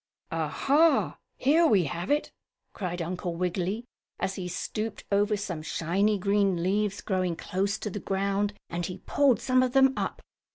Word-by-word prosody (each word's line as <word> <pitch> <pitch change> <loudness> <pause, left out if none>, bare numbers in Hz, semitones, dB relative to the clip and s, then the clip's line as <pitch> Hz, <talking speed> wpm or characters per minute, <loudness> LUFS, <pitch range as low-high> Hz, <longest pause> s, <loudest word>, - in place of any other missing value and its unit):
"Ah, - - -1
ha! 310 +4 +3 0.2
Here 320 +5 +4
we 205 - +4
have 170 +4 -4
it!" 295 +1 +1 0.4
cried 175 -3 -3
Uncle 175 0 -3
Wiggily, 185 +5 -2 0.3
as 190 - -1
he 185 -2 -5
stooped 215 +4 -4
over 205 +1 +2
some 180 -6 -4
shiny 195 +7 +1
green 200 -2 +1
leaves, 200 +2 0
growing 185 -3 0
close 195 +5 -1
to 210 - -5
the 205 - -4
ground, 200 +1 -1
and 175 0 -3
he 180 +2 -6
pulled 280 -4 +3
some 255 -1 +3
of 255 -1 0
them 270 0 +5
up. - - -3
200 Hz, 165 wpm, -28 LUFS, 180-220 Hz, 0.4 s, them